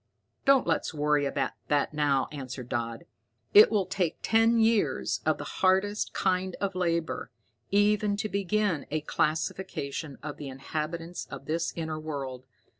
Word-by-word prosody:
"Don't 275 -2 +5
let's 165 -1 0
worry 150 -1 +2
about 140 0 -1 0.2
that 145 0 +1
now," 145 -3 +2
answered 130 -4 -6
Dodd. 115 -1 -3 0.5
"It 210 - +9
will 205 -4 +1
take 185 -3 -1
ten 225 +1 +4
years 225 -1 +2
of - - +3
the - - -5
hardest 190 +3 +1
kind 185 -1 0
of 195 -1 -1
labor 170 -6 -1 0.4
even 205 0 +3
to 210 - -1
begin 200 -5 0
a 155 +1 -1
classification 155 -2 -2
of 145 -1 -5
the 145 -2 -6
inhabitants 160 +5 -4
of - - -9
this 165 +1 -1
inner 160 -2 -3
world. 135 -5 -5
165 Hz, 145 wpm, -28 LUFS, 145-200 Hz, 0.5 s, It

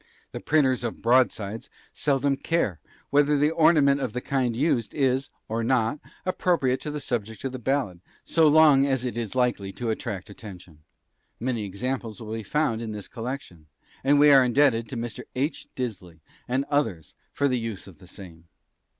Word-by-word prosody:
The - - -6
printers 135 -5 +2
of 115 - -5
"broadsides" 115 -3 +1 0.2
seldom 140 -1 +1
care 135 - -1 0.3
whether 145 +1 +4
an 145 +2 +2
ornament 155 -4 +4
of 120 - -3
the 125 - -2
kind 125 -3 -1
used 125 -4 0
is, 135 -1 +1 0.2
or 115 +1 -2
not, 120 +2 +1 0.3
appropriate 170 -8 +1
to 150 - -5
the 150 0 -4
subject 110 -5 -4
of 135 - -2
the 130 - -6
ballad, 120 -8 -1 0.2
so 165 -2 +4
long 150 -3 +6
as 130 -2 0
it 125 - -3
is 115 0 -3
likely 120 -6 0
to 115 +2 -2
attract 100 -2 -5
attention. 90 -7 -12 0.6
Many 120 -3 -2
examples 115 +2 -4
will 110 -1 -7
be 115 - -3
found 115 0 0
in 110 -2 -5
this 105 -2 -7
collection, 115 - -7 0.4
and 145 +2 +4
we 145 0 +7
are 135 -2 +7
indebted 120 -3 +2
to 130 - -5
Mr. 120 +1 -5
H. 140 +4 -2
Disley 95 -10 -6 0.3
and 130 +3 0
others 110 - -1 0.2
for 140 - +1
the 125 -2 0
use 115 -4 -5
of 90 -6 -15
the 90 - -16
same. 85 -4 -12
125 Hz, 175 wpm, -25 LUFS, 110-140 Hz, 0.6 s, we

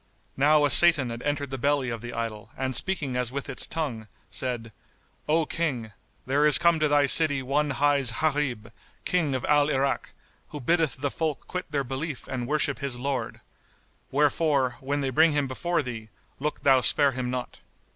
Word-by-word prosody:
Now 150 +2 +4
a 145 - +1
Satan 160 -8 +6
had 115 +1 -7
entered 145 -1 -3
the 135 - -4
belly 140 -1 0
of 115 -2 -5
the 120 0 -7
idol 115 -2 -5
and 130 -1 -2
speaking 150 -9 -1
as 125 -1 -1
with 140 +1 -5
its 135 -3 -2
tongue, 130 -10 -4 0.2
said, 120 -3 -3 0.6
"O 160 +1 +2
King, 135 -10 -3 0.3
there 145 +3 +2
is 150 - +9
come 170 -1 +3
to 155 - +2
thy 145 -1 +3
city 145 -1 +2
one 145 +3 0
hight 140 -2 +1
Gharib, 145 -8 -1 0.3
King 160 -7 0
of 130 - -3
Al 145 0 +3
Irak, 135 -1 -1 0.3
who 150 - -8
biddeth 165 +2 +1
the 145 -1 -1
folk 155 -3 -3
quit 180 -2 -5
their 145 -2 -1
belief 135 +2 -5
and 125 -2 -4
worship 145 -1 0
his 140 -3 -3
Lord; 135 +1 -4 0.7
wherefore, 140 -3 +1
when 140 +2 -2
they 135 -1 -2
bring 160 +4 +4
him 145 -2 0
before 170 +6 -1
thee, 115 -4 -7 0.3
look 150 +2 -4
thou 135 -2 +5
spare 140 +5 +3
him 125 -1 -4
not." 125 0 -5
140 Hz, 185 wpm, -26 LUFS, 125-150 Hz, 0.7 s, is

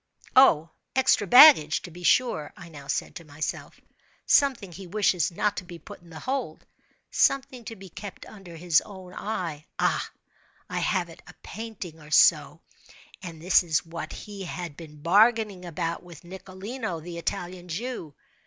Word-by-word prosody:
"Oh, 165 - +5 0.2
extra 255 -5 +3
baggage, 245 - +8
to 175 - -9
be 175 +2 -12
sure," 175 -6 +1
I 175 - -11
now 145 -3 -12
said 145 - -2
to 170 - -11
myself—"something 185 - -2
he 190 +2 -10
wishes 180 -4 +1
not 205 +4 -1
to - - -4
be 175 -1 -10
put 165 - -13
in 170 - -18
the 160 -1 -10
hold—something 265 -1 -2
to 225 - -7
be 195 -1 -12
kept 200 +3 -9
under 195 -5 -12
his 165 -2 +2
own 190 -3 -12
eye—ah, 170 -9 -3 0.6
I - - -3
have 185 -4 0
it—a 165 +1 -15
painting 205 -7 -8
or 150 -1 -14
so—and 165 +2 0
this 185 - +5
is 165 -4 -1
what 165 0 -7
he 200 -3 -8
has 175 -1 -5
been 150 0 -13
bargaining 205 +1 +3
about 165 0 -3
with 175 -1 -14
Nicolino, 190 +2 -6
the 170 +1 -8
Italian 175 +1 -5
Jew." 175 - -5
180 Hz, 150 wpm, -26 LUFS, 165-210 Hz, 0.6 s, baggage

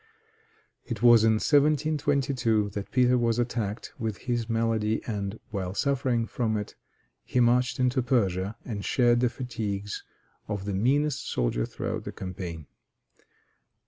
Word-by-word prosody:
It 115 -3 -5
was 120 -2 +7
in 110 0 +5
1722 140 -5 +2
that 100 0 -5
Peter 125 0 +3
was 115 -1 +1
attacked 115 -3 -2
with 110 -1 -4
this 120 -2 -1
malady, 115 -1 +1
and 105 -1 -4
while 95 -2 -3
suffering 130 -4 +1
from 110 -1 -1
it 105 - -5 0.5
he 125 - -1
marched 125 +1 +3
into 130 +1 +2
Persia, 100 -5 0
and 105 -4 -4
shared 120 0 +3
the 125 0 +2
fatigues 105 -6 -4 0.4
of 100 -2 -4
the 100 - -2
meanest 140 +8 +1
soldier - - 0
throughout - - -4
the - - -4
campaign. 90 -4 -6
115 Hz, 135 wpm, -27 LUFS, 105-125 Hz, 0.5 s, was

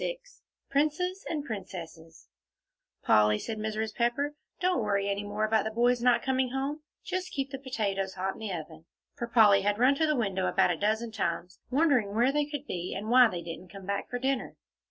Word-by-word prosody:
XXVII - - -2 0.5
PRINCES 310 +7 0
AND 300 -3 -2
PRINCESSES 170 - -8 0.8
"Polly," 105 0 +4
said 220 - -5
Mrs. 215 0 -2
Pepper, 245 +5 0 0.3
"don't 365 -8 +1
worry 200 -2 0
any 200 0 -1
more 205 +1 -1
about 215 -1 +2
the 220 - -2
boys 240 +2 +2
not 245 0 +3
coming 260 -1 +1
home; 275 +4 -3 0.2
just 370 0 -3
keep 275 -1 -3
the 270 - -5
potatoes 200 -7 -2
hot 190 +1 -2
in - - -13
the 220 -3 -4
oven." 160 -2 -7 0.3
For 235 - -5
Polly 210 -4 +6
had 205 +1 +1
run 255 +4 +5
to 315 +3 +1
the 305 - +2
window 195 -6 0
about - - +3
a - - 0
dozen 220 +5 0
times, 180 -3 -3
wondering 255 -8 +2
where 240 +4 +4
they 295 +1 +1
could 290 -1 -6
be, 180 -8 -4
and 215 +3 -4
why 250 0 +8
they 175 -5 -5
didn't 170 +2 -8
come 195 -1 -10
back 200 +1 -3
for 245 - -2
dinner. 265 0 -1
220 Hz, 200 wpm, -29 LUFS, 195-270 Hz, 0.8 s, why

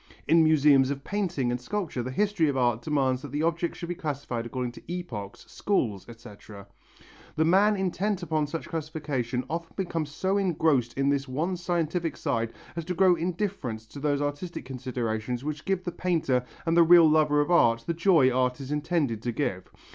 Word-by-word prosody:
In 165 0 +5
museums 145 -4 +5
of 140 -1 -4
painting 175 -12 -1
and 125 0 -3
sculpture 175 -4 -3
the 125 - -4
history 195 +2 +1
of 135 - -1
art 120 -2 +1
demands 130 -3 0
that 145 - -8
the 145 +2 -1
objects 170 +1 -1
should 170 - -6
be - - -1
classified 140 -8 -4
according 125 0 -3
to 140 - -11
epochs, 115 - -6
schools, 115 - -1
etc. 105 -3 -12 0.7
The 160 - +2
man 200 +5 +4
intent 190 0 -1
upon 155 -3 0
such 165 +2 -5
classification 145 -6 -3
often 165 0 -5
becomes 165 -5 -2
so 190 +7 0
engrossed 155 - +1
in 135 0 +2
this 140 -1 0
one 160 +8 -1
scientific 175 -1 -2
side 115 -6 -1 0.2
as 170 - -3
to 180 +1 -3
grow 185 0 +5
indifferent 175 - -3
to 145 - -8
those 145 0 0
artistic 145 +2 -4
considerations 125 -2 -3
which 150 0 -5
give 190 -1 0
the 175 - -3
painter 160 -8 0 0.2
and 165 0 +1
the 170 - +7
real 170 0 +8
lover 150 -1 +3
of 145 +4 +1
art 115 -9 +4
the 170 - -1
joy 165 -6 +4
art 125 0 +1
is 135 0 -7
intended 150 -6 -1
to 120 - -2
give. 100 -8 -3
150 Hz, 185 wpm, -27 LUFS, 125-170 Hz, 0.7 s, real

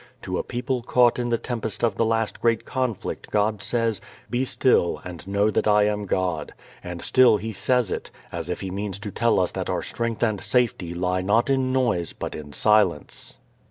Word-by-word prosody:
To - - -2
a - - -2
people 125 +1 -2
caught 120 0 +3
in 120 0 -1
the 115 - +2
tempest 115 -3 -4
of 115 -3 +3
the 115 - +2
last 115 -1 -1
great 115 -2 +2
conflict 130 -6 -3
God 105 0 +1
says, 115 +1 0 0.3
"Be 120 +2 +1
still, 125 -9 +2
and 90 0 -8
know 100 +2 +2
that 110 - +1
I 105 0 +5
am 105 0 0
God," 90 -5 -1 0.3
and 90 -1 -6
still 130 -4 +5
He 110 +2 -5
says 125 0 +1
it, - - -4 0.2
as - - -5
if - - -3
He 95 - -4
means 100 0 -4
to 105 0 -6
tell 115 0 +2
us 90 - +1
that - - -4
our - - -1
strength 115 -1 -2
and 110 -4 +1
safety 120 -9 +1
lie 90 +1 -1
not 110 +8 +2
in 130 -1 +1
noise 120 -10 +1
but - - -5
in 75 -1 -8
silence. 105 -3 +2
110 Hz, 200 wpm, -24 LUFS, 95-120 Hz, 0.3 s, I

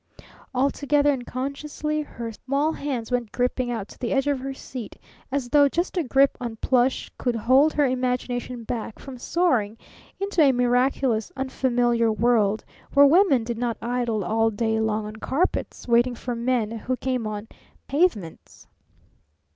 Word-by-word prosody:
Altogether 285 +2 +2
unconsciously 280 +4 -3
her 235 -6 -6
small 275 +7 -1
hands 265 -7 -4
went 245 -4 -1
gripping 250 +1 -1
out 225 -4 -3
to - - -14
the 245 - -2
edge 270 0 +2
of 285 -2 0
her 270 +1 -4
seat, 255 -4 -8 0.4
as 265 -3 -2
though 285 +1 +5
just 345 +7 -2
a 355 - +2
grip 275 -1 +3
on 235 -2 -4
plush 255 +3 +1
could 245 -2 0
hold 260 +7 +4
her 295 - +3
imagination 250 -1 -2
back 225 -1 -5
from 265 -2 -10
soaring 240 - +1 0.4
into 395 -3 +1
a 280 -3 +6
miraculous, 245 -2 +1
unfamiliar 245 -3 +1
world 215 -2 +2 0.3
where 285 0 +8
women 290 - +5
did 230 0 -4
not 235 -3 -1
idle 235 -3 -1
all 225 +1 +2
day 220 +1 -1
long 220 -1 0
on 215 +1 -8
carpets 280 +7 -2
waiting 240 +1 +3
for 245 +1 -4
men 235 -2 0
who 235 +3 -3
came 255 -4 -2
on 210 0 -5 0.4
pavements. 275 - -1
250 Hz, 155 wpm, -24 LUFS, 230-275 Hz, 0.4 s, where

